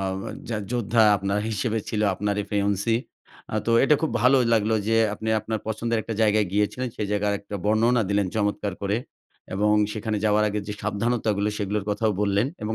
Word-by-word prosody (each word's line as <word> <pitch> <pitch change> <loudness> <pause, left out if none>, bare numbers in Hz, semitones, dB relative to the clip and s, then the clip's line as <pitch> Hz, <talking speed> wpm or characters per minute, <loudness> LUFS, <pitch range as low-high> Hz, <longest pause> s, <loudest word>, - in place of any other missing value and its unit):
আও 95 -1 -2 0.4
যা 115 - -1 0.2
যোদ্ধা 115 -1 +2
আপনার 100 +1 -1
হিসেবে 110 +1 -1
ছিল 105 - -2
আপনার 105 +2 -1 0.2
ফেওন্সি। 100 +2 +1 0.6
আ - - -2
তো - - +1
এটা 150 - +5
খুব 160 - +1
ভালো 130 +2 +5 0.2
লাগলো 110 0 +2
যে, 115 - +3 0.2
আপনি 110 +1 -5
আপনার 110 +1 -3
পছন্দের 115 +1 -1
একটা 115 - -5
জায়গায় 105 -1 +3
গিয়েছিলেন। 105 +5 0
সে - - -3
জায়গায় 105 0 +1
একটা 100 - -9
বর্ণনা 115 +3 +3
দিলেন 100 -1 +2
চমৎকার 105 -1 -1
করে। 100 +1 0 0.6
এবং 105 +2 +2 0.2
সেখানে 110 0 -2
যাওয়ার 105 0 +3
আগে 105 0 -2
যে - - -2
সাবধানতাগুলো 105 0 0
সেগুলোর 105 0 -2
কথাও 105 +1 +1
বললেন। 100 +2 +2 0.2
এবং 110 +1 -2
105 Hz, 180 wpm, -24 LUFS, 100-115 Hz, 0.6 s, এটা